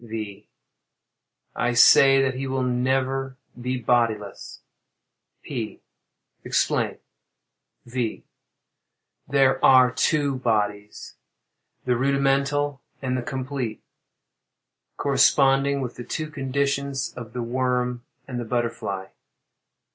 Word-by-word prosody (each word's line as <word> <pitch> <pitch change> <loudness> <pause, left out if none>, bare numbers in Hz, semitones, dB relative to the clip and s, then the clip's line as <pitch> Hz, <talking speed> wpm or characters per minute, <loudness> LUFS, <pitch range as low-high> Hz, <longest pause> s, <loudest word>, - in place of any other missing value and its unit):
V. 110 -3 -7 1.1
I 125 0 0
say 135 +2 +7
that 130 -1 0
he 135 +1 -4
will 130 0 -1
never 130 +1 -1 0.2
be 125 +1 -2
bodiless. 115 -4 -1 0.8
P. - - -6 0.6
Explain. - - 0 0.9
V. 120 -2 -3 1.0
There 135 -1 +2
are 130 -2 +7
two 145 0 +1
bodies—the 105 +2 -4
rudimental 140 +1 +1 0.2
and 130 -1 -2
the 130 - -1
complete; 130 -2 -4 1.1
corresponding 140 0 +3
with 125 -2 -5
the 120 - -6
two 155 +4 -4
conditions 140 0 -2
of 120 -3 -9
the 125 - -3
worm 125 0 -1 0.2
and 125 -2 -4
the - - -3
butterfly. 115 -5 -2
130 Hz, 95 wpm, -24 LUFS, 120-135 Hz, 1.1 s, say